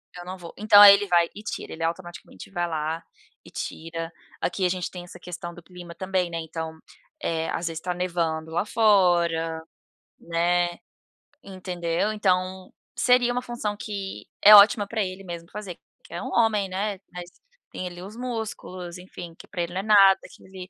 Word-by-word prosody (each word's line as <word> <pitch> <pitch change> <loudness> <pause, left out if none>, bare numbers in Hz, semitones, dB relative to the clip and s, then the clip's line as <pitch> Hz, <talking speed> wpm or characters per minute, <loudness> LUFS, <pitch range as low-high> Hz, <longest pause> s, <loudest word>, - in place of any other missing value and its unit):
Eu 175 0 -9
não 185 +1 -6
vou. 170 -2 -10
Então 205 -1 +7
aí 205 -1 +12
ele 205 +1 -2
vai 170 -2 +3
e 210 - -9
tira, 225 - -6
ele 165 0 -5
automaticamente 175 +1 -6
vai 175 -2 -2
lá 160 0 -3 0.4
e - - -14
tira. 165 0 -5 0.3
Aqui 180 +2 -1
a 180 - +3
gente 180 -1 -2
tem 180 -1 -8
essa 175 - -12
questão 175 -1 -7
do 175 - -12
clima 175 0 -11
também, 185 -1 -1
né, 165 0 -4
então 160 0 -6 0.7
às 170 +1 -2
vezes 165 -1 -4
está 180 +2 -3
nevando 170 -3 -2
lá 175 +4 0
fora, 175 -7 +2 0.6
né, 175 +1 +1 0.8
entendeu. 180 0 -2
Então 185 -2 -1 0.2
seria 245 0 +3
uma 250 +1 -1
função 240 -4 -4
que 200 -2 -6
é 210 - +10
ótima 205 0 +7
pra 220 +1 -2
ele 185 0 -6
mesmo 170 -2 -8
fazer, 200 -5 -7 0.3
que - - -14
é - - -4
um - - -5
homem, 220 -4 +2
né, 195 +1 -2
mas 175 -1 -7 0.4
tem 185 - -5
ali 175 0 -9
os 200 +4 -9
músculos, 220 -7 -5
enfim, 180 -2 -10
que - - -14
pra 180 - -4
ele 170 0 -4
não 185 - -2
é - - -11
nada, 200 -2 +6
que - - -17
ele 185 -1 -10
180 Hz, 185 wpm, -25 LUFS, 170-200 Hz, 0.8 s, aí